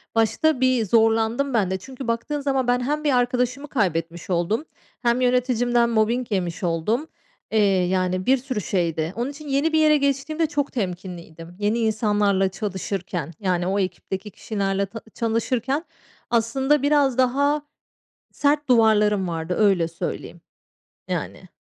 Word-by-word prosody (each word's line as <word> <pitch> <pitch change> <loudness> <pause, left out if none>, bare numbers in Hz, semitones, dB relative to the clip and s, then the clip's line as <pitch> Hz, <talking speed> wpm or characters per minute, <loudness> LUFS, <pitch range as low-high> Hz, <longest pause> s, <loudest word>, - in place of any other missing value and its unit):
Başta 250 +6 +2
bir 255 -3 +3
zorlandım, 225 +5 +2
bende. 190 -5 +1
Çünkü 260 +5 -9
baktığın 235 +6 -2
zaman 270 -3 0
ben 245 0 +3
hem 295 +4 -1
bir 295 - +2
arkadaşımı 250 +3 0
kaybetmiş 170 - -2
oldum 185 - 0 0.4
hem 240 0 +2
yöneticimden 245 -1 +2
mobbing 230 +1 +1
yemiş 180 -2 -2
oldum. 180 - 0 0.4
Eee, 220 - +2 0.3
yani, 185 0 0
bir 265 +1 +4
sürü 255 -4 -4
şeydi. 170 -3 -1
Onun 240 +4 -2
için 295 +1 -11
yeni 285 +4 +1
bir 315 - +4
yere 305 -1 +5
geçtiğimde 280 +3 0
çok 290 -2 -2
temkinliydim. 175 -5 -6
Yeni 210 +3 +1
insanlarla 210 -3 +2
çalışırken, 190 -5 -4
yani, 180 -3 0
o 195 +2 0
ekipteki 190 +2 -4
kişilerle 200 -1 -2
ta 225 +3 -9
çalışırken 240 +5 -1 0.5
aslında 265 +5 +2
biraz 285 -3 +3
daha 280 +4 +2 0.7
sert 295 0 +1
duvarlarım 210 -4 +4
vardı. 165 +1 -3
Öyle 195 -6 +3
söyleyeyim, 170 0 -6 0.7
yani. - - -4
225 Hz, 135 wpm, -23 LUFS, 190-265 Hz, 0.7 s, yere